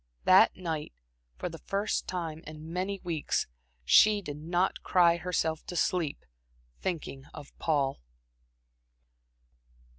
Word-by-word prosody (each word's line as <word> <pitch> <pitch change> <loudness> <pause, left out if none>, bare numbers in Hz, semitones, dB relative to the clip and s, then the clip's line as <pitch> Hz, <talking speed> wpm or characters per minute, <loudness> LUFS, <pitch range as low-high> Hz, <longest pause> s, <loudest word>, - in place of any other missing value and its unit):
That - - +6
night, 160 - -4 0.4
for - - -3
the 165 -2 -8
first 200 +2 -2
time 165 -3 -4
in 155 +1 -9
many 190 +2 -2
weeks, 165 -4 -1 0.4
she 210 - +6
did 145 -4 -6
not 175 +4 0
cry 170 -2 +4
herself 165 -3 -1
to 180 - -6
sleep, 170 -3 0 0.5
thinking 155 -6 -4
of 145 - -11
Paul. 140 - 0
165 Hz, 115 wpm, -29 LUFS, 155-180 Hz, 0.5 s, That